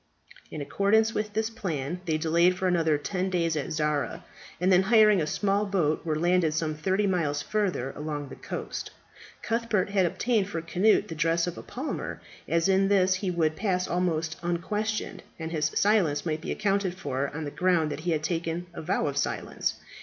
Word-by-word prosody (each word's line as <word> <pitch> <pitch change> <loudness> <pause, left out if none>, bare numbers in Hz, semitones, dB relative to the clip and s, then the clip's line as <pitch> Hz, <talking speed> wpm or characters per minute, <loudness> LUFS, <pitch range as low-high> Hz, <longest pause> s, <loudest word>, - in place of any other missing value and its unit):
In 155 - -6
accordance 220 +8 +2
with 210 -1 -2
this 220 +1 -1
plan, 175 - -3
they 160 -3 +1
delayed 170 +3 +3
for 185 - 0
another 165 -4 +2
ten 185 +5 -2
days 170 -3 0
at 145 -3 -3
Zara, 150 +2 -1 0.3
and 185 +1 +2
then, 180 - +6
hiring 210 -1 +5
a 155 - -1
small 200 +5 0
boat, 170 -6 +1
were 155 -2 -1
landed 170 -1 +2
some 155 -1 0
thirty 190 +6 0
miles 160 -7 0
further 185 -11 -1
along 150 -2 -4
the - - -8
coast. - - -5 0.5
Cuthbert 225 -4 0
had 190 -3 +3
obtained 215 +1 0
for 170 - -3
Cnut 180 +6 +2
the - - -6
dress 165 +1 +1
of 175 -1 -4
a - - -8
palmer, 265 +5 -5 0.3
as 165 +1 +2
in 195 0 +3
this 190 -2 +4
he 185 +1 -2
would 160 -3 +1
pass 185 -1 0
almost 170 -2 -1
unquestioned, 210 +5 -2 0.2
and 160 0 -5
his 155 -2 0
silence 195 -9 +2
might 155 -1 -1
be - - -4
accounted 200 -3 0
for 140 -5 -2
on 155 +2 -5
the 145 - -4
ground 175 -3 +2
that - - -4
he 175 +3 -3
had 155 -2 0
taken 165 +1 -2
a - - -6
vow 155 - 0
of 140 -1 -2
silence. - - -1
175 Hz, 190 wpm, -27 LUFS, 155-195 Hz, 0.5 s, then